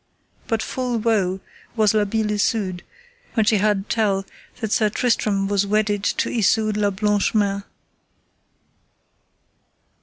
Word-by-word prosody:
But 225 Hz, -1 st, 0 dB
full 250 Hz, -2 st, -2 dB
woe 205 Hz, -5 st, 0 dB, 0.3 s
was 215 Hz, -2 st, +3 dB
La 210 Hz, -1 st, +2 dB
Beale 215 Hz, +1 st, -1 dB
Isoud 205 Hz, -3 st, 0 dB, 0.5 s
when 220 Hz, -3 st, +3 dB
she 220 Hz, -1 st, +3 dB
heard 205 Hz, -1 st, +1 dB
tell 200 Hz, -4 st, 0 dB, 0.3 s
that 220 Hz, -3 st, -3 dB
Sir 215 Hz, -1 st, +3 dB
Tristram 210 Hz, -3 st, 0 dB
was 200 Hz, 0 st, +1 dB
wedded 205 Hz, -1 st, +1 dB
to -, -, 0 dB
Isoud 215 Hz, -1 st, +1 dB
la 205 Hz, -1 st, +2 dB
Blanche 205 Hz, +2 st, 0 dB
Mains. 200 Hz, -2 st, +1 dB
210 Hz, 125 wpm, -22 LUFS, 200-220 Hz, 0.5 s, was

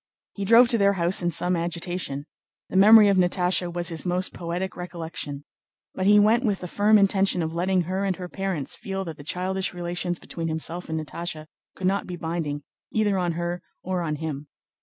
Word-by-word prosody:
He 200 Hz, -, -4 dB
drove 230 Hz, +4 st, +7 dB
to 235 Hz, -3 st, +2 dB
their 200 Hz, 0 st, +4 dB
house 175 Hz, 0 st, +1 dB
in 175 Hz, -, +1 dB
some 180 Hz, +2 st, +2 dB
agitation. 170 Hz, -4 st, -3 dB, 0.4 s
The -, -, -7 dB
memory 210 Hz, +2 st, +8 dB
of 200 Hz, -1 st, +3 dB
Natásha 180 Hz, 0 st, +2 dB
was 175 Hz, -1 st, -1 dB
his 165 Hz, -2 st, -3 dB
most 180 Hz, +1 st, -1 dB
poetic 175 Hz, +2 st, -4 dB
recollection. 165 Hz, -5 st, -6 dB, 0.5 s
But 190 Hz, -, -1 dB
he 210 Hz, 0 st, +7 dB
went 220 Hz, +4 st, +4 dB
with 205 Hz, -5 st, 0 dB
the 180 Hz, -, -5 dB
firm 210 Hz, +4 st, +4 dB
intention 195 Hz, -3 st, +2 dB
of 160 Hz, 0 st, -3 dB
letting 180 Hz, +2 st, +1 dB
her 185 Hz, +3 st, -2 dB
and 195 Hz, -2 st, 0 dB
her 180 Hz, 0 st, -7 dB
parents 185 Hz, -7 st, -3 dB
feel 195 Hz, -1 st, -4 dB
that 160 Hz, -2 st, -7 dB
the 145 Hz, -, -10 dB
childish 185 Hz, +4 st, -2 dB
relations 175 Hz, 0 st, -3 dB
between 165 Hz, 0 st, -5 dB
himself 160 Hz, +2 st, -3 dB
and 160 Hz, 0 st, -1 dB
Natásha 155 Hz, 0 st, -5 dB, 0.3 s
could 185 Hz, -, -5 dB
not 195 Hz, +2 st, +1 dB
be 180 Hz, -, -5 dB
binding 160 Hz, -3 st, -3 dB, 0.3 s
either 205 Hz, -3 st, +1 dB
on 175 Hz, -2 st, 0 dB
her 175 Hz, +1 st, -3 dB, 0.2 s
or 185 Hz, -1 st, -2 dB
on 155 Hz, -3 st, -2 dB
him. 150 Hz, -2 st, -5 dB
180 Hz, 200 wpm, -25 LUFS, 170-195 Hz, 0.5 s, memory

